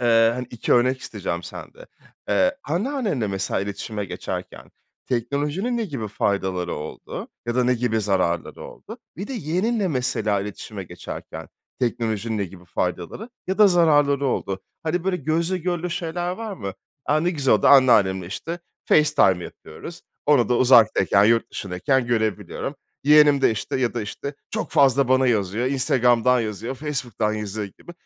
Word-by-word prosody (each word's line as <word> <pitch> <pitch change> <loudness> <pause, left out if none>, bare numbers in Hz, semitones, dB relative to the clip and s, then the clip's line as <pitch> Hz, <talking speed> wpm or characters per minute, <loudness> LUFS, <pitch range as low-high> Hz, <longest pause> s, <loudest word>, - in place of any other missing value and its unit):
eee, 115 -1 +5
hani 125 0 -4
2 120 - -1
örnek 130 +2 +3
isteyeceğim 95 -7 -4
sende. - - -10 0.4
Eee, 275 0 +2
anneannenle 200 - -1
mesela 95 -1 -1
iletişime 100 +1 -4
geçerken 90 - -6 0.4
teknolojinin 145 - -1
ne 230 - -1
gibi 135 - -5
faydaları 95 -3 -1
oldu 75 +1 -7 0.2
ya 120 - -1
da 125 - +2
ne 125 0 +3
gibi 115 -2 0
zararları 90 -5 -1
oldu? 225 +4 -11 0.2
Bir 195 - -5
de - - -5
yeğeninle 200 +3 0
mesela 125 - 0
iletişime 100 0 -7
geçerken - - -8 0.3
teknolojinin 115 -2 -1
ne 100 - 0
gibi 90 -1 -12
faydaları 90 - -3 0.2
ya 190 +1 -2
da 210 -2 +8
zararları 145 -5 +3
oldu? 95 -6 -2 0.2
Hani 165 +2 -1
böyle 190 -1 +1
gözle 165 +4 0
görülür 175 0 -2
şeyler 175 +1 -3
var 220 +2 -5
mı? 100 - -5 0.3
A, 150 +1 +2
ne 175 +3 +1
güzel 140 -8 +2
oldu, - - +2
anneannemle 110 -9 +5
işte 165 - -5 0.3
FaceTime 100 - +4
yapıyoruz. 170 - -10 0.2
Onu 140 -5 +4
da 125 - +2
uzaktayken, 115 -5 +5
yurt 115 +1 +3
dışındayken 120 +7 -1
görebiliyorum. 110 -2 -2 0.3
Yeğenim 150 -1 +6
de - - +5
işte 110 +4 -3
ya 120 -2 0
da 120 - -2
işte, 140 +7 -6 0.2
çok - - -3
fazla 135 -2 +4
bana 130 0 +4
yazıyor, 110 0 0
Instagram'dan 125 -2 +3
yazıyor. 115 +3 -4
Facebook'tan 125 -7 -2
yazıyor 105 -1 -4
gibi 175 - -12
125 Hz, 155 wpm, -23 LUFS, 105-155 Hz, 0.4 s, da